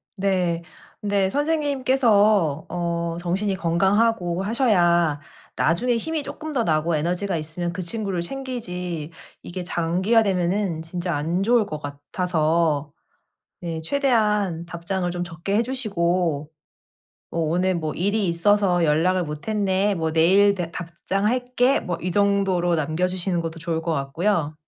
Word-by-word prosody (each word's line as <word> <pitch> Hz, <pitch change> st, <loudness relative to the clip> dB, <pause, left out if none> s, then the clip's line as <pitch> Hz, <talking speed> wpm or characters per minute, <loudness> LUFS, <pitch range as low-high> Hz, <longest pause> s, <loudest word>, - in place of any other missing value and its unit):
네. 185 Hz, -4 st, 0 dB, 0.4 s
근데 200 Hz, -2 st, +1 dB
선생님께서 255 Hz, -, +2 dB
어 170 Hz, -1 st, -2 dB
정신이 190 Hz, +3 st, -1 dB
건강하고 190 Hz, +1 st, +1 dB
하셔야 175 Hz, -, +2 dB, 0.4 s
나중에 235 Hz, +10 st, +1 dB
힘이 315 Hz, +4 st, -2 dB
쪼끔 305 Hz, +2 st, -6 dB
더 245 Hz, -4 st, +1 dB
나고 160 Hz, -2 st, +1 dB
에너지가 175 Hz, +4 st, -1 dB
있으면 160 Hz, +3 st, -3 dB
그 185 Hz, -, -5 dB
친구를 195 Hz, -1 st, -2 dB
챙기지 180 Hz, -, -4 dB, 0.3 s
이게 180 Hz, +1 st, -6 dB
장기화되면은 185 Hz, 0 st, +1 dB
진짜 175 Hz, 0 st, -3 dB
안 165 Hz, +6 st, -1 dB
좋을 235 Hz, 0 st, +3 dB
것 155 Hz, -, -5 dB
같아서 155 Hz, 0 st, -1 dB, 0.7 s
네 165 Hz, -2 st, -4 dB
최대한 210 Hz, -, +1 dB
답장을 175 Hz, +2 st, -3 dB
좀 175 Hz, 0 st, -3 dB
적게 170 Hz, +4 st, -3 dB
해 230 Hz, -, +3 dB
주시고 175 Hz, -, -1 dB, 0.8 s
어 -, -, -4 dB
'오늘 175 Hz, +3 st, +1 dB
뭐 155 Hz, -2 st, -2 dB
일이 200 Hz, +3 st, 0 dB
있어서 180 Hz, 0 st, +2 dB
연락을 175 Hz, +4 st, +2 dB
못 150 Hz, +3 st, -7 dB
했네. 200 Hz, -1 st, +1 dB
뭐 160 Hz, -2 st, -1 dB
내일 195 Hz, +5 st, +5 dB
내 175 Hz, -3 st, -4 dB
답장할게.' 240 Hz, +9 st, 0 dB
뭐 175 Hz, -2 st, -4 dB
이 180 Hz, -, -2 dB
정도로 195 Hz, -3 st, +2 dB
남겨 155 Hz, +3 st, 0 dB
주시는 180 Hz, -1 st, -1 dB
것도 165 Hz, 0 st, -5 dB
좋을 165 Hz, 0 st, -2 dB
것 165 Hz, -, -1 dB
같고요. 155 Hz, +3 st, 0 dB
180 Hz, 280 characters per minute, -23 LUFS, 165-205 Hz, 0.8 s, 내일